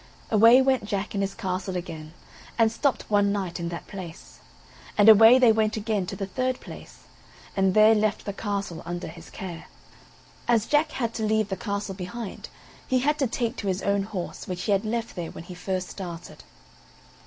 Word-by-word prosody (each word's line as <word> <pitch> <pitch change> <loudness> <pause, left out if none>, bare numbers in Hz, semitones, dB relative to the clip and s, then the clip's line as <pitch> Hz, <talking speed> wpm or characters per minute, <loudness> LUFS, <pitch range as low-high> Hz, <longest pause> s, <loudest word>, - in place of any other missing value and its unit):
Away 230 +4 +7
went 260 -3 +2
Jack 200 -1 -3
and 200 - -1
his 195 0 -2
castle 185 0 -3
again, 160 -3 -7 0.4
and 225 -2 +4
stopped 270 +4 -1
one 205 -1 +3
night 190 -4 -3
in 170 0 -3
that 170 - -6
place; 180 -4 -10 0.6
and 205 0 +5
away 225 +3 +9
they 250 -3 +6
went 220 0 +1
again 210 -3 -1
to - - -5
the 195 - -3
third 255 +6 -2
place, - - -12 0.5
and 190 -1 +2
there 215 +1 +7
left 215 -1 0
the 200 - -3
castle 200 -5 -4
under 175 +1 -5
his 165 +1 -10
care. 175 -3 -7 0.8
As 230 -3 +3
Jack 305 +1 +2
had 235 -3 -2
to 220 - -3
leave 215 -1 +1
the 190 - -1
castle 200 0 -4
behind, 195 +3 -7 0.4
he 260 - +2
had 295 +3 +1
to 270 - +2
take 235 +1 -2
to 205 - -4
his 185 0 -1
own 200 0 +1
horse, 195 -3 -6
which 180 -1 -4
he 205 - +3
left 225 +3 -3
there 175 -3 -4
when - - -9
he 180 - -10
first 185 0 -3
started. 175 -3 -8
200 Hz, 190 wpm, -26 LUFS, 185-225 Hz, 0.8 s, away